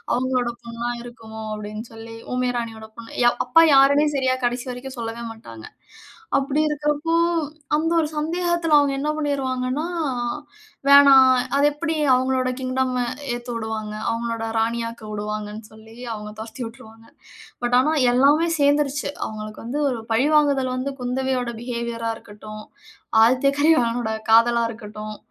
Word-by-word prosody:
அவுங்களோட 250 Hz, -1 st, 0 dB
பெண்ணா 235 Hz, +1 st, -4 dB
இருக்குமோ? 225 Hz, -2 st, -10 dB
அப்பிடின்னு 215 Hz, +2 st, -7 dB
சொல்லி 225 Hz, 0 st, -10 dB, 0.2 s
ஊமைய 250 Hz, 0 st, 0 dB
ராணியோட 220 Hz, -1 st, -7 dB
பொண்ணு 235 Hz, +1 st, -1 dB, 0.2 s
அப்பா 330 Hz, +7 st, +6 dB
யாருமே 285 Hz, +2 st, +5 dB
சரியா 260 Hz, -1 st, +1 dB
கடைசி 245 Hz, +1 st, -1 dB
வரைக்கும் 260 Hz, +1 st, -8 dB
சொல்லவே 230 Hz, 0 st, -5 dB
மாட்டாங்க. 115 Hz, -, -12 dB, 0.7 s
அப்பிடி 275 Hz, +2 st, 0 dB
இருக்கிறப்போ! 295 Hz, +2 st, -1 dB, 0.6 s
அந்த 315 Hz, +2 st, 0 dB
ஒரு 310 Hz, -, +1 dB
சந்தேகத்தில 340 Hz, 0 st, +1 dB
அவுங்க 285 Hz, -1 st, +3 dB
என்ன 295 Hz, +2 st, -1 dB
பண்ணிருவாங்கன்னா, 270 Hz, 0 st, -1 dB, 1.0 s
வேணாம். 280 Hz, -2 st, +8 dB, 0.3 s
அது 285 Hz, -, +4 dB
எப்பிடி 320 Hz, +2 st, -3 dB, 0.2 s
அவுங்களோட 255 Hz, 0 st, +1 dB
கிங்டம் 255 Hz, 0 st, -1 dB, 0.4 s
ஏத்து 240 Hz, +1 st, -7 dB
விடுவாங்க. 220 Hz, -1 st, -4 dB, 0.2 s
அவுங்களோட 230 Hz, 0 st, -2 dB
ராணியாக்க 230 Hz, 0 st, -2 dB
உடுவாங்கன்னு 210 Hz, +1 st, -5 dB
சொல்லி, 220 Hz, +1 st, -15 dB, 0.2 s
அவுங்க 210 Hz, -1 st, -7 dB
துரத்தி 225 Hz, +3 st, -7 dB
விட்டுருவாங்க. 225 Hz, -1 st, -13 dB, 0.6 s
பட் 245 Hz, +1 st, +2 dB
ஆனா 300 Hz, +4 st, +1 dB, 0.2 s
எல்லாமே 290 Hz, +6 st, +4 dB
சேர்ந்துருச்சு. 285 Hz, 0 st, +2 dB, 0.2 s
அவுங்களுக்கு 215 Hz, 0 st, -8 dB
வந்து 260 Hz, +6 st, -3 dB
ஒரு 240 Hz, -, -3 dB
பழிவாங்குதல் 275 Hz, 0 st, +2 dB
வந்து 275 Hz, +2 st, -3 dB
குந்தவையோட 250 Hz, -1 st, -1 dB
பிஹேவியர் 235 Hz, -1 st, -4 dB
ஆ -, -, 0 dB
இருக்கட்டு.ம் 215 Hz, 0 st, -11 dB, 0.6 s
ஆதித்ய 255 Hz, +4 st, +3 dB
கரிகாலனோட 240 Hz, -7 st, +2 dB, 0.2 s
காதலா 235 Hz, +1 st, +5 dB
இருக்கட்டும். 215 Hz, -1 st, -8 dB
245 Hz, 130 wpm, -22 LUFS, 225-275 Hz, 1.0 s, வேணாம்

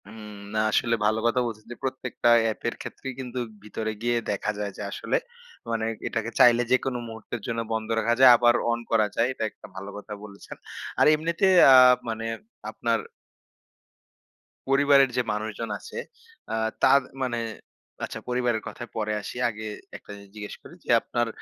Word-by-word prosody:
উম 105 Hz, 0 st, -10 dB, 0.2 s
না, 110 Hz, -, 0 dB
আসলে 115 Hz, +1 st, +2 dB
ভালো 110 Hz, +1 st, +2 dB
কথা 120 Hz, +2 st, +2 dB
বলছেন, 110 Hz, -2 st, -6 dB
যে, -, -, -6 dB
প্রত্যেকটা 130 Hz, -2 st, -1 dB
অ্যাপের 115 Hz, +1 st, -2 dB
ক্ষেত্রেই 135 Hz, -1 st, -7 dB
কিন্তু 125 Hz, -1 st, -5 dB, 0.2 s
ভিতরে 110 Hz, +1 st, -4 dB
গিয়ে 120 Hz, 0 st, +1 dB
দেখা 105 Hz, +1 st, -1 dB
যায় 105 Hz, -1 st, -3 dB
যে, -, -, -7 dB
আসলে -, -, -1 dB, 0.5 s
মানে 110 Hz, -1 st, -1 dB, 0.2 s
এটাকে 115 Hz, 0 st, -2 dB
চাইলে, 120 Hz, 0 st, +7 dB
যেকোন 130 Hz, 0 st, +2 dB
মুহূর্তের 115 Hz, +1 st, -7 dB
জন্য 115 Hz, -1 st, -2 dB
বন্ধ 110 Hz, -1 st, -2 dB
রাখা 115 Hz, +1 st, +2 dB
যায়, 130 Hz, -1 st, +10 dB
আবার 120 Hz, 0 st, +4 dB, 0.2 s
অন 120 Hz, -, 0 dB
করা 110 Hz, -2 st, +4 dB
যায়। 115 Hz, -, +2 dB
এটা 130 Hz, -, -5 dB
একটা -, -, -14 dB
ভালো 95 Hz, +1 st, -7 dB
কথা 105 Hz, +1 st, -8 dB
বলেছেন। 100 Hz, -1 st, -11 dB, 0.4 s
আর -, -, +6 dB
এমনিতে 170 Hz, +4 st, +1 dB, 0.3 s
আ -, -, +10 dB, 0.3 s
মানে, 115 Hz, 0 st, -3 dB, 0.5 s
আপনার -, -, 0 dB, 1.7 s
পরিবারের 140 Hz, 0 st, +5 dB
যে, -, -, +4 dB
মানুষজন 110 Hz, +2 st, -4 dB
আছে, 460 Hz, -, -10 dB, 0.6 s
আ -, -, +1 dB, 0.3 s
তার 140 Hz, +1 st, +6 dB, 0.2 s
মানে, 120 Hz, -2 st, -1 dB, 0.7 s
আচ্ছা -, -, -7 dB
পরিবারের 125 Hz, -3 st, 0 dB
কথায় 120 Hz, -, -8 dB
পরে 110 Hz, -1 st, -1 dB
আসি, 120 Hz, -, -7 dB
আগে 110 Hz, -1 st, -7 dB, 0.3 s
একটা -, -, -14 dB
জিনিস 100 Hz, -1 st, -15 dB
জিজ্ঞেস 105 Hz, -1 st, -7 dB
করি -, -, -13 dB
যে, -, -, -14 dB
আপনার 120 Hz, 0 st, -1 dB
115 Hz, 165 wpm, -26 LUFS, 110-125 Hz, 1.7 s, যায়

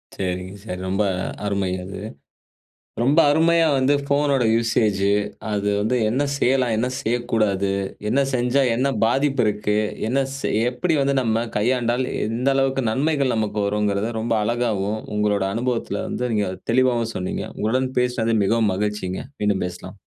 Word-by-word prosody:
சரிங்க, 90 Hz, 0 st, -4 dB
சரி. 90 Hz, -4 st, -5 dB
ரொம்ப 95 Hz, +3 st, +1 dB, 0.4 s
அருமை 100 Hz, -2 st, 0 dB
அது. 95 Hz, +1 st, -7 dB, 1.0 s
ரொம்ப 145 Hz, +7 st, +4 dB
அருமையா 165 Hz, +1 st, +4 dB
வந்து 135 Hz, +2 st, +3 dB
ஃபோனோட 140 Hz, -2 st, +2 dB
யூசேஜு, 110 Hz, -4 st, +1 dB, 0.4 s
அது 105 Hz, 0 st, 0 dB
வந்து 110 Hz, +5 st, +1 dB
என்ன 130 Hz, +6 st, +1 dB
செய்யலாம், 125 Hz, -3 st, +2 dB
என்ன 120 Hz, +3 st, 0 dB
செய்யக்கூடாது, 110 Hz, -4 st, 0 dB, 0.4 s
என்ன 135 Hz, +5 st, +2 dB
செஞ்சா 125 Hz, +3 st, +2 dB
என்ன 130 Hz, +4 st, +1 dB, 0.2 s
பாதிப்பு 135 Hz, +2 st, +2 dB
இருக்கு, 105 Hz, 0 st, 0 dB, 0.3 s
என்ன 135 Hz, +3 st, +1 dB, 0.2 s
செய் 110 Hz, -5 st, 0 dB
எப்படி 160 Hz, +6 st, -1 dB
வந்து 140 Hz, 0 st, +1 dB
நம்ம 115 Hz, 0 st, 0 dB
கையாண்டால், 120 Hz, +2 st, +1 dB, 0.2 s
எந்த 120 Hz, +5 st, 0 dB
அளவுக்கு 135 Hz, -1 st, +1 dB
நன்மைகள் 140 Hz, +1 st, +1 dB
நமக்கு 105 Hz, -1 st, -1 dB
வரும்ங்கிறத, 105 Hz, +1 st, 0 dB
ரொம்ப 115 Hz, 0 st, 0 dB
அழகாவும் 110 Hz, -2 st, -1 dB, 0.2 s
உங்களோட 105 Hz, -1 st, +1 dB
அனுபவத்துல 120 Hz, 0 st, -2 dB
வந்து 125 Hz, -1 st, -2 dB
நீங்க 105 Hz, -3 st, +1 dB, 0.2 s
தெளிவாவும் 120 Hz, -2 st, +2 dB
சொன்னீங்க. 90 Hz, 0 st, -3 dB
உங்களுடன் 130 Hz, +4 st, 0 dB
பேசினது 120 Hz, -2 st, +1 dB
மிகவும் 110 Hz, -1 st, +2 dB
மகிழ்ச்சிங்க. 105 Hz, -2 st, -2 dB, 0.2 s
மீண்டும் 100 Hz, -3 st, +1 dB
பேசலாம். 90 Hz, +2 st, -9 dB
115 Hz, 135 wpm, -22 LUFS, 105-130 Hz, 1.0 s, ரொம்ப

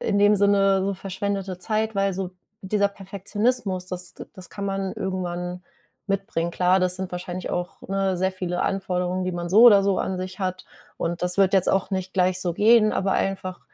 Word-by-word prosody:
in 200 Hz, -, 0 dB
dem 205 Hz, +1 st, +5 dB
Sinne 195 Hz, -1 st, +3 dB
so 200 Hz, 0 st, -1 dB
verschwendete 195 Hz, 0 st, -4 dB
Zeit, 220 Hz, +1 st, -1 dB
weil 195 Hz, 0 st, +1 dB
so 185 Hz, 0 st, -4 dB, 0.3 s
dieser 200 Hz, +1 st, +1 dB
Perfektionismus, 200 Hz, 0 st, -2 dB
das 180 Hz, -1 st, -6 dB
d -, -, -9 dB
das 185 Hz, -2 st, -11 dB
kann 200 Hz, -, -6 dB
man 195 Hz, -1 st, -2 dB
irgendwann 180 Hz, -1 st, -4 dB, 0.5 s
mitbringen. 195 Hz, -4 st, -1 dB
Klar, 180 Hz, +2 st, +2 dB
das 180 Hz, 0 st, +1 dB
sind 190 Hz, -1 st, -5 dB
wahrscheinlich 180 Hz, 0 st, -5 dB
auch, 175 Hz, 0 st, -4 dB
ne, 195 Hz, -1 st, 0 dB
sehr 190 Hz, +1 st, 0 dB
viele 180 Hz, -1 st, -3 dB
Anforderungen, 185 Hz, -1 st, -1 dB
die 185 Hz, -, -2 dB
man 175 Hz, 0 st, -4 dB
so 215 Hz, +5 st, +6 dB
oder 200 Hz, -4 st, +7 dB
so 200 Hz, -1 st, +2 dB
an 185 Hz, -1 st, -2 dB
sich 185 Hz, +1 st, -6 dB
hat, 185 Hz, 0 st, -3 dB, 0.3 s
und 170 Hz, +1 st, -3 dB
das 180 Hz, +1 st, +1 dB
wird 195 Hz, -1 st, +4 dB
jetzt 190 Hz, -, +4 dB
auch 195 Hz, +1 st, 0 dB
nicht 190 Hz, 0 st, -3 dB
gleich 185 Hz, 0 st, +2 dB
so 175 Hz, -2 st, -1 dB
gehen, 215 Hz, +1 st, +5 dB
aber 195 Hz, 0 st, 0 dB
einfach 185 Hz, -2 st, -2 dB
190 Hz, 195 wpm, -24 LUFS, 180-195 Hz, 0.5 s, oder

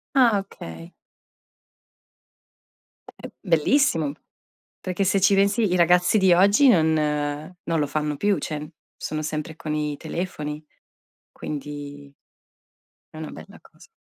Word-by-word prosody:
Ah, 235 Hz, -6 st, +5 dB
okay. 85 Hz, -, -10 dB, 2.2 s
È -, -, -12 dB
è -, -, -17 dB
bellissimo. 165 Hz, -, +2 dB, 0.7 s
Perché 185 Hz, +2 st, -2 dB
se 195 Hz, +1 st, +2 dB
ci 200 Hz, +1 st, +4 dB
pensi 200 Hz, 0 st, +2 dB
i -, -, +3 dB
ragazzi 180 Hz, +4 st, +4 dB
di 190 Hz, -2 st, +4 dB
oggi 200 Hz, +9 st, +5 dB
non 160 Hz, -8 st, +4 dB
non 150 Hz, +2 st, -2 dB
lo 145 Hz, -, +1 dB
fanno 150 Hz, 0 st, -2 dB
più, 205 Hz, +3 st, +1 dB
cioè 150 Hz, 0 st, -5 dB, 0.3 s
sono 155 Hz, 0 st, -4 dB
sempre 155 Hz, +1 st, -4 dB
con 155 Hz, -1 st, -4 dB
i 150 Hz, -1 st, -2 dB
telefoni, 155 Hz, -2 st, -5 dB, 0.7 s
quindi 145 Hz, -1 st, -7 dB, 1.0 s
è -, -, -10 dB
una 155 Hz, 0 st, -6 dB
bella 80 Hz, -, -12 dB
cosa. -, -, -19 dB
160 Hz, 125 wpm, -24 LUFS, 150-190 Hz, 2.2 s, Ah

